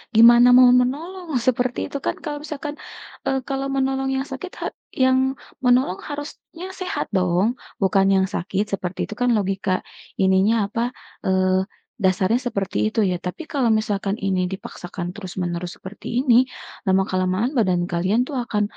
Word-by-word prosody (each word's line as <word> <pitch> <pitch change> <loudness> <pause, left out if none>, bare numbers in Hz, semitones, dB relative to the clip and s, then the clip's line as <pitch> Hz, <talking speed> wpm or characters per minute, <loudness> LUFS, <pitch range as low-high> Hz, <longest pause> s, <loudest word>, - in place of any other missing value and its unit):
gimana 235 +2 +8
mau 255 -1 +8
menolong, 335 +8 -4 0.2
seperti 250 0 +1
itu, - - -5
kan, - - 0
kalau 295 -2 -3
misalkan, 295 -1 -5 0.6
eee, 270 - +1
kalau 270 0 -1
menolong 270 0 0
yang 265 +1 -1
sakit 365 +8 -6
ha - - -2 0.4
yang 260 0 +4 0.5
menolong 245 -6 +3
harusnya 295 +4 -7
sehat 365 - -2
dong, 180 +2 +2 0.3
bukan 195 0 +3
yang 190 0 +3
sakit, 190 +3 -1
seperti 185 -2 -3
itu, - - -7
kan, 245 - +3
logika 195 -1 -1 0.5
ininya 190 +3 +4
apa, 230 +3 -3 0.4
eee, 185 0 +2 0.4
dasarnya 190 +5 +3
seperti 200 - -3
itu, - - -2
ya. 180 -1 +1
Tapi 180 - -5
kalau 275 -6 0
misalkan 210 -2 0
ini 185 -2 0
dipaksakan 180 -1 -6
terus-menerus 180 -3 -4
seperti 190 +2 -10
ini, 255 -3 +4 0.5
lama-kelamaan 190 +5 +1
badan 185 -7 +2
kalian 185 +8 +1
itu 290 - -8
akan 240 -5 0
210 Hz, 145 wpm, -22 LUFS, 185-260 Hz, 0.6 s, gimana